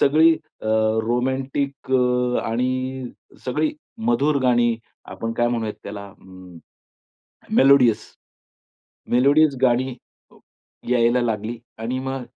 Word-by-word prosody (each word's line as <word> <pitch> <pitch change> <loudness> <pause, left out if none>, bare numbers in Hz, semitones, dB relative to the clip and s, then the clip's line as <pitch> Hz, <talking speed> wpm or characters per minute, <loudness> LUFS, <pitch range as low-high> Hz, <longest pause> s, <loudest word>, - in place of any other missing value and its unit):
सगळी 160 +4 +5
अ, 155 -8 -13 0.4
रोमॅन्टिक 130 +2 -2
अ, 125 -1 +2
आणि 130 +2 -2 0.4
सगळी 305 - 0 0.4
मधुर 150 -11 +2
गाणी, 120 -2 +3 0.3
आपण 115 0 -5
काय 120 0 +1
म्हणूयात 115 -3 -2
त्याला 100 0 -7
अ, 95 -3 -16 0.8
मेलोडियस, 130 -5 +5 1.1
मेलोडीज 140 +3 +4
गाणी 130 +1 +2 0.9
यायला 120 0 +3
लागली. 115 0 -2 0.2
आणि 120 +3 -3
मग 135 0 -4
125 Hz, 95 wpm, -22 LUFS, 115-135 Hz, 1.1 s, सगळी